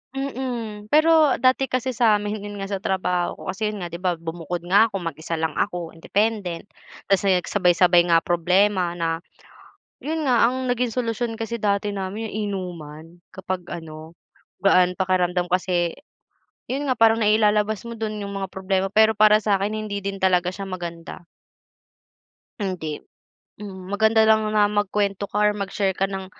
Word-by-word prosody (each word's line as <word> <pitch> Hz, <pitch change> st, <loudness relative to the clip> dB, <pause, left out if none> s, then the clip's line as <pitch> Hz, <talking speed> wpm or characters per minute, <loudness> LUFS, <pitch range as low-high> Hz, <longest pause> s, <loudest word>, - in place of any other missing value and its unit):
Mm, 240 Hz, -6 st, -4 dB
pero 310 Hz, +1 st, +5 dB
dati 260 Hz, +2 st, +2 dB
kasi 255 Hz, 0 st, -1 dB
sa 225 Hz, -3 st, +3 dB
amin, 210 Hz, +1 st, -3 dB
yun 205 Hz, 0 st, -7 dB
nga, 195 Hz, -1 st, -5 dB
sa 195 Hz, -, -2 dB
trabaho 180 Hz, -2 st, -1 dB
ko -, -, -15 dB
kasi, 215 Hz, +2 st, -2 dB
yun 210 Hz, -3 st, -4 dB
nga, 175 Hz, -, -6 dB
'di 170 Hz, -, -6 dB
ba, 180 Hz, -1 st, 0 dB
bumukod 165 Hz, +1 st, -6 dB
nga 200 Hz, +6 st, +5 dB
ako, 205 Hz, -, -9 dB
mag-isa 165 Hz, 0 st, -4 dB
lang 160 Hz, 0 st, -1 dB
ako, 175 Hz, -4 st, -2 dB
independent. 200 Hz, 0 st, -1 dB, 0.5 s
Tapos, 195 Hz, +1 st, +3 dB
yun, 185 Hz, -2 st, +3 dB
sabay-sabay 175 Hz, -2 st, +3 dB
nga 165 Hz, -1 st, +4 dB
problema 180 Hz, +1 st, +2 dB
na, 165 Hz, -1 st, -1 dB, 0.8 s
yun 315 Hz, +1 st, -3 dB
nga, 240 Hz, -3 st, +4 dB
ang 260 Hz, +1 st, -3 dB
naging 250 Hz, 0 st, 0 dB
solusyon 230 Hz, -1 st, -2 dB
kasi 225 Hz, 0 st, -4 dB
dati 205 Hz, 0 st, 0 dB
namin, 200 Hz, +3 st, -5 dB
inuman, 175 Hz, -5 st, -6 dB
kapag 185 Hz, -1 st, -5 dB
ano, 160 Hz, -1 st, -9 dB, 0.5 s
gaan 180 Hz, -2 st, +4 dB
pakiramdam 180 Hz, -2 st, 0 dB
kasi, 180 Hz, -2 st, +1 dB, 0.8 s
yun 280 Hz, +2 st, -2 dB
nga, 255 Hz, -, +1 dB
parang 225 Hz, -1 st, +4 dB
nailalabas 210 Hz, -1 st, +2 dB
mo 235 Hz, -1 st, -7 dB
do'n 215 Hz, -2 st, -3 dB
yung 200 Hz, 0 st, -5 dB
mga 195 Hz, -, -3 dB
problema. 190 Hz, 0 st, -1 dB
Pero 220 Hz, 0 st, +5 dB
para 215 Hz, 0 st, +6 dB
sa 205 Hz, -2 st, +2 dB
akin, 205 Hz, +2 st, -1 dB
hindi 215 Hz, -2 st, -4 dB
din 195 Hz, -1 st, -4 dB
talaga 180 Hz, -1 st, +2 dB
siya 195 Hz, -, -6 dB
maganda. 170 Hz, -2 st, -7 dB, 1.3 s
Hindi, 180 Hz, -7 st, -3 dB, 0.7 s
mm, 190 Hz, -2 st, -8 dB
maganda 220 Hz, +2 st, +3 dB
lang 220 Hz, 0 st, +4 dB
na 210 Hz, -1 st, +4 dB
magkuwento 205 Hz, -1 st, -1 dB
ka -, -, -2 dB
or 210 Hz, -, +2 dB
mag-share 200 Hz, -1 st, -2 dB
ka 195 Hz, +2 st, -1 dB
ng 190 Hz, -1 st, -5 dB
200 Hz, 165 wpm, -23 LUFS, 180-220 Hz, 1.3 s, para